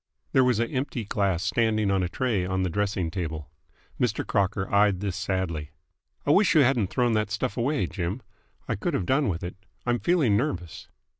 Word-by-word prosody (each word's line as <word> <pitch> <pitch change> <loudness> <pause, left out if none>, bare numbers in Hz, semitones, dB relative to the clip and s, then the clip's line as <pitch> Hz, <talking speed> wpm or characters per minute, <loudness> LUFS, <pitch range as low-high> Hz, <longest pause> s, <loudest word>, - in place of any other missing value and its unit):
There 130 - +5
was 125 -3 +3
an 115 +1 -1
empty 130 -4 -2
glass 100 -4 0
standing 110 +1 +1
on 95 -1 +2
a 90 - -1
tray 115 -2 0
on 95 +1 -1
the 90 - -1
dressing 95 -3 -1
table. 80 -4 -4 0.5
Mr. 120 -4 0
Crocker 100 -1 0
eyed 100 -2 +4
this 100 -2 -3
sadly. 90 -5 -2 0.6
"I 145 - +3
wish 195 +4 +4
you 155 - +7
hadn't 120 -6 +3
thrown 120 +4 +1
that 110 -1 +1
stuff 105 -1 -2
away, 135 +5 0
Jim. 95 +6 -4 0.4
I - - 0
could - - -1
have 95 - -1
done 135 +1 +2
with 85 -2 -3
it. 90 - -5 0.3
I'm 120 0 +1
feeling 140 - +3
nervous." 95 - -3
105 Hz, 195 wpm, -26 LUFS, 95-120 Hz, 0.6 s, you